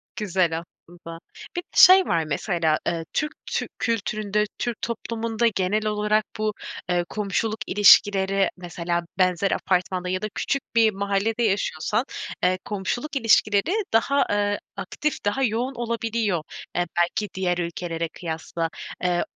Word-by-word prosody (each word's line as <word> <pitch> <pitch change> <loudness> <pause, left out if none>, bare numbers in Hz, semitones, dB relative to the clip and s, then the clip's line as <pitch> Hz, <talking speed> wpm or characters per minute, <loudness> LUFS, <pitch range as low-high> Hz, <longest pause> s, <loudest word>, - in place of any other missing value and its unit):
Güzel 185 -6 0
aslında. 170 0 -13 0.4
Bir 350 - -1
de - - -39
şey 370 0 +9
var 165 -2 +1
mesela, 160 +1 0
eee, 165 -1 -1
Türk 300 0 0
tü - - -2
kültüründe, 210 -2 0 0.2
Türk 240 -2 -3
toplumunda 230 0 -1
genel 210 +1 0
olarak 210 0 +1
bu, 215 0 0 0.4
eee, 175 -1 +1
komşuluk 215 +1 -1
ilişkileri, 195 -1 +5
mesela 175 -1 -2 0.2
benzer 185 +1 +2
apartmanda 180 0 0
ya 185 +2 -1
da 215 - -1
küçük 275 - -1
bir 225 -1 +5
mahallede 200 +4 0
yaşıyorsan, 210 - 0 0.4
eee, 185 0 +3
komşuluk 215 +9 -3
ilişkileri 220 - +3 0.2
daha, 275 +5 +3
eee, 205 0 +1 0.2
aktif, 300 -7 -3
daha 205 +7 +1
yoğun 245 +3 0
olabiliyor, 230 -6 -1 0.3
eee, 175 - +1
belki 195 +4 +1
diğer 180 -2 0
ülkelere 170 -1 -3
kıyasla. 165 -1 -4 0.3
Eee, 175 -1 +2
200 Hz, 135 wpm, -24 LUFS, 175-225 Hz, 0.4 s, şey